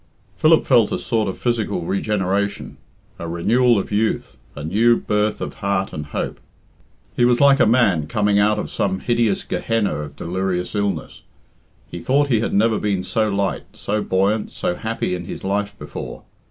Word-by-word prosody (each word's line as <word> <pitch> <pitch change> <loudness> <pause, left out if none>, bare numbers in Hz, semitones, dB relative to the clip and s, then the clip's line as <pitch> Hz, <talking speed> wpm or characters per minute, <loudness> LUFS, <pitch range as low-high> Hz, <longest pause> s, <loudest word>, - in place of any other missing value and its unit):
Philip 160 +1 +4
felt 120 -5 +4
a - - 0
sort 110 -3 -1
of 95 - -5
physical 120 -6 -1
regeneration, 100 +2 -1 0.4
a 85 - -5
renewal 115 +8 +3
of 100 - -3
youth, 110 +2 -1 0.2
a 75 - -7
new 115 +9 +3
birth 105 0 0
of - - -4
heart 100 -1 -1
and 75 -1 -5
hope. - - -4 0.8
He 120 - +2
was 120 0 +4
like 140 -1 +6
a - - +5
man 105 -10 +3
coming 105 +4 +2
out 105 +1 +3
of - - -4
some 95 -1 -1
hideous 115 -4 +1
Gehenna 115 -3 -1
of 75 -1 -7
delirious 90 +1 -2
illness; 100 -1 -2 0.6
he - - -8
though 140 +3 +2
he 130 -6 +1
had 115 - -1
never 110 +1 +2
been 100 -3 -1
so 110 +4 0
light, 100 -1 -1
so 105 +1 -2
buoyant, 100 +4 0
so - - -2
happy 110 0 -3
in 90 -1 -4
his - - -7
life 100 +1 -2
before. - - -8
105 Hz, 175 wpm, -21 LUFS, 95-115 Hz, 0.8 s, like